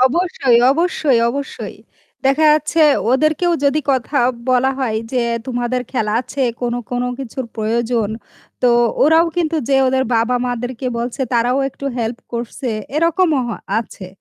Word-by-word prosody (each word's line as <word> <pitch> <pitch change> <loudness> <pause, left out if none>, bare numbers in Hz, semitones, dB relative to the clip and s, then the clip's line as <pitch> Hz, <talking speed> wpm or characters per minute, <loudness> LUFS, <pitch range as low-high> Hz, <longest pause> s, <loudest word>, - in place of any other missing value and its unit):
অবশ্যই, 265 -3 +3
অবশ্যই, 310 -5 +1
অবশ্যই, 280 +2 -6 0.5
দেখা 275 +4 +3
যাচ্ছে 310 +1 +2 0.3
ওদেরকেও 310 +6 +2
যদি 285 +2 +2
কথা 265 +2 0 0.3
বলা 255 +1 +3
হয় 230 -5 -1
যে 250 -2 +1 0.2
তোমাদের 245 0 -1
খেলা 215 -5 0
আছে 270 +2 -4 0.2
কোনো 240 -1 -1
কোনো 245 0 -1
কিছুর 260 0 -5
প্রয়োজন, 225 0 0 0.5
তো 250 - +5 0.3
ওরাও 320 +3 +5
কিন্তু 330 -2 0
যেয়ে 270 -1 +4
ওদের 260 0 +1
বাবা 230 +2 +2
মাদেরকে 245 +1 -4
বলছে 240 +3 -4
তারাও 245 +2 +2
একটু 275 - -11
হেল্প 230 +1 -2
করছে 240 +2 -4 0.3
এরকমও 330 -2 +2
হ - - -3 0.3
আছে 210 -4 -7
255 Hz, 140 wpm, -18 LUFS, 240-295 Hz, 0.5 s, তো